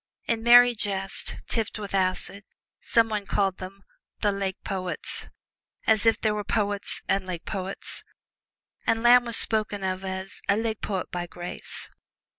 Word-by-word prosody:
In 230 -1 0
merry 245 +1 +8
jest, 195 -3 -1
tipped 225 -3 -1
with 205 -2 -7
acid, 190 +1 0 0.4
some 230 -1 +3
one 210 -3 -3
called 195 -2 0
them 195 +1 -9 0.4
"The 205 - +3
Lake 195 -1 -3
Poets," 185 -2 -3 0.6
as 220 0 +3
if 225 - +4
there 215 -1 +1
were 210 0 -3
poets 205 -1 -1
and 195 -1 0
lake 175 -3 -5
poets. 195 -1 -5 0.8
And 225 0 +2
Lamb 245 +1 +7
was 235 -1 0
spoken 210 -2 +4
of 185 0 -2
as 190 +1 -5
"a 200 - +4
Lake 220 -1 -2
Poet 190 -3 -3
by 175 -1 -3
grace." 175 0 -7
200 Hz, 155 wpm, -26 LUFS, 190-220 Hz, 0.8 s, merry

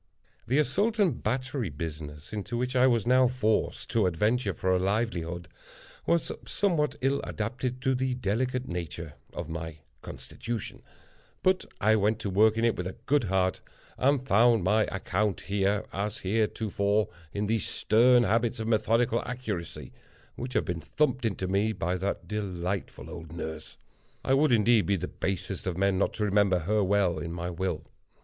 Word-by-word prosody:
The 130 +4 +2
Assault 195 - +2
and 185 - +2
Battery 130 -4 -1
business, 75 0 -7
into 105 +3 -3
which 125 +2 -2
I 130 +1 +6
was 115 -4 +2
now 130 +1 +5
forced 115 -3 0
to 110 -5 +3
adventure 105 +6 +1
for 95 0 -1
a 90 - +3
livelihood, 90 -4 -1 0.6
was 170 -1 +2
somewhat 170 -7 0
ill 135 +2 +1
adapted 125 +3 -3
to 130 - +3
the 130 0 0
delicate 125 +3 -1
nature 85 -2 -5 0.2
of - - -5
my 80 -1 -5 0.2
constitution; 115 -3 -6 0.6
but 185 0 +3
I 110 +2 +4
went 105 +1 +2
to 100 - -2
work 110 +3 +4
in 115 - +2
it 115 - +2
with 90 - -3
a 95 - -7
good 145 -3 +2
heart, 95 -1 +1 0.3
and 135 0 +1
found 115 -1 +5
my 105 +4 +3
account 95 +1 -1
here, 100 +1 0
as 100 +1 -2
heretofore, 105 0 0 0.2
in 100 +1 -2
those 110 -3 0
stern 120 +3 +4
habits 115 +2 +1
of 110 - -3
methodical 115 +1 +2
accuracy 110 -9 -5 0.4
which 125 +1 -5
had - - +1
been 85 -3 -3
thumped 130 - 0
into 95 -4 -1
me 100 +4 +1
by 90 -3 -1
that 95 +2 -3
delightful 95 -3 -3
old 80 -1 -9
nurse—I 80 +9 -6
would 145 +2 +4
indeed 115 -1 +4
be 100 - +3
the 90 -1 -3
basest 95 0 -3
of 90 -2 -2
men 95 0 +2
not - - +1
to 105 - 0
remember 100 -2 +3
her 105 +5 +1
well 95 -4 +2
in 85 +1 -5
my 85 +1 -4
will. 85 -3 -2
105 Hz, 165 wpm, -28 LUFS, 95-125 Hz, 0.6 s, I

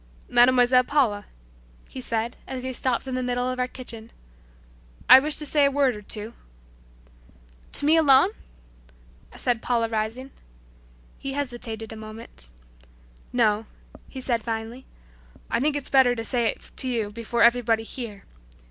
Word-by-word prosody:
"Mademoiselle 250 +1 +5
Paula," 245 -8 +1 0.6
he 260 - -8
said 230 0 -2
as 255 -1 -5
he 260 0 -4
stopped 255 +1 -1
in 260 - -4
the 255 - -1
middle 245 0 -1
of 255 0 -3
our 250 - +1
kitchen, 235 -3 -8 1.0
"I 260 - +10
wish 295 +2 +1
to 300 - -3
say 295 0 +3
a 280 - +5
word 275 -3 +2
or 210 - -9
two." 210 +2 -5 1.4
"To - - -1
me 315 +2 +5
alone?" 275 -8 +5 1.1
said 240 -3 -1
Paula 235 -2 0
rising. 225 +4 -3 0.9
He 275 - -5
hesitated 240 -5 -4
a - - -8
moment. 215 - -10 0.8
"No," 220 -3 +1 0.4
he 265 - -8
said 240 -3 -1
finally, 225 +3 -5 0.6
"I - - +1
think 290 +3 +1
it's 290 - -4
better 260 -3 +5
to 225 -1 -5
say 240 -2 +1
it - - -5
to 260 - +2
you 225 -5 -2
before 230 +2 -1
everybody 235 -2 +3
here. 225 -4 -8
245 Hz, 150 wpm, -25 LUFS, 225-260 Hz, 1.4 s, I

